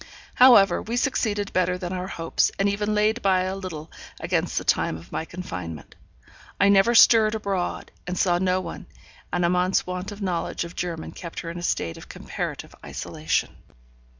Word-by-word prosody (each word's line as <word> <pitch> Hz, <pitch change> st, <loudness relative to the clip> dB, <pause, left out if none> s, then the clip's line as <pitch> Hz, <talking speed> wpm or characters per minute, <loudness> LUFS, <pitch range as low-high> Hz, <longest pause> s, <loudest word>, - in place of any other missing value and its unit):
However, 240 Hz, -6 st, +6 dB
we 235 Hz, +2 st, -3 dB
succeeded 210 Hz, -6 st, 0 dB
better 180 Hz, 0 st, +1 dB
than 180 Hz, -1 st, -5 dB
our 185 Hz, 0 st, -3 dB
hopes, 165 Hz, -3 st, 0 dB
and 195 Hz, -, +2 dB
even 210 Hz, +1 st, 0 dB
laid 215 Hz, +3 st, +2 dB
by 190 Hz, -2 st, +3 dB
a 185 Hz, +1 st, -2 dB
little 170 Hz, -5 st, -7 dB, 0.3 s
against -, -, -1 dB
the -, -, 0 dB
time 80 Hz, -, +1 dB
of 85 Hz, +2 st, -14 dB
my 160 Hz, -, -3 dB
confinement. 90 Hz, -, -7 dB, 0.7 s
I 200 Hz, -, +5 dB
never 200 Hz, +4 st, +5 dB
stirred 225 Hz, -1 st, +6 dB
abroad, 195 Hz, -4 st, -3 dB, 0.2 s
and 180 Hz, 0 st, -3 dB
saw 175 Hz, -1 st, +2 dB
no 185 Hz, 0 st, +1 dB
one, -, -, -8 dB, 0.4 s
and 175 Hz, 0 st, +1 dB
Amante's 180 Hz, +2 st, +2 dB
want 180 Hz, +2 st, -5 dB
of 205 Hz, -, -9 dB
knowledge 180 Hz, -5 st, -2 dB
of 170 Hz, 0 st, -9 dB
German 170 Hz, -3 st, -4 dB
kept 170 Hz, -2 st, -7 dB
her 165 Hz, -, -6 dB
in 175 Hz, -, -7 dB
a -, -, -7 dB
state 85 Hz, -, -2 dB
of -, -, -13 dB
comparative -, -, -6 dB
isolation. -, -, -2 dB
185 Hz, 180 wpm, -24 LUFS, 175-200 Hz, 0.7 s, However